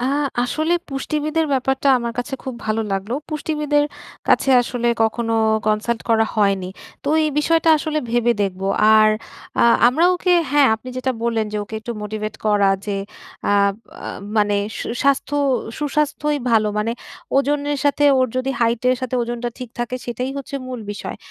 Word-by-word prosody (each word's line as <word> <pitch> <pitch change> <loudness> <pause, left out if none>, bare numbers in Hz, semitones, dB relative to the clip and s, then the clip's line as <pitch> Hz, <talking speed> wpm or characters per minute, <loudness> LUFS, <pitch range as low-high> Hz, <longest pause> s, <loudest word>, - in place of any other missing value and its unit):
আ - - -1 0.4
আসলে 310 +7 0 0.2
পুষ্টিবিদের 305 +3 -1
ব্যাপারটা 265 +1 +1
আমার 235 -1 -3
কাছে 245 +2 -2
খুব 260 - -4
ভালো 220 +1 0
লাগলো, 195 +5 -2
পুষ্টিবিদের 300 -1 0 0.4
কাছে 270 - +3
আসলে 240 0 -2
কখনো 225 +1 0 0.3
কনসাল্ট 215 +2 0
করা 225 0 +4
হয়নি। 195 -3 +2 0.4
তো 280 - -2 0.2
এই 305 - +1
বিষয়টা 330 +2 +2
আসলে 305 0 -2
ভেবে 240 0 +3
দেখব 190 -1 -3 0.3
আর 215 0 +6 0.5
আ - - +5 0.3
আমরা 300 +7 +2
ওকে 360 0 +1 0.2
হ্যাঁ, 290 -1 +5
আপনি 225 +3 -9
যেটা 260 0 -1
বললেন। 225 -2 0
যে 210 - -2
ওকে 220 - -10
একটু 235 - -5
মোটিভেট 215 0 -4
করা 205 -2 +4 0.2
যে 200 -1 -1 0.5
আ - - +4 0.5
আ - - -5 0.3
মানে 205 -1 +3 0.2
শু - - -4 0.2
স্বাস্থ্য 280 +1 +1 0.4
সুস্বাস্থ্যই 295 0 0
ভালো 215 -2 +3
মানে 220 +2 0 0.5
ওজনের 290 +1 0
সাথে 290 0 +2
ওর 255 - +3
যদি 255 +1 0
হাইটের 235 +2 +2
সাথে 255 -1 -3
ওজনটা 240 0 -3
ঠিক 250 -2 -6
থাকে 240 +1 -2
সেটাই 250 +2 -3
হচ্ছে 280 +1 -6
মূল 255 -2 -5
বিষয়। 205 - -6
245 Hz, 160 wpm, -20 LUFS, 220-290 Hz, 0.5 s, আর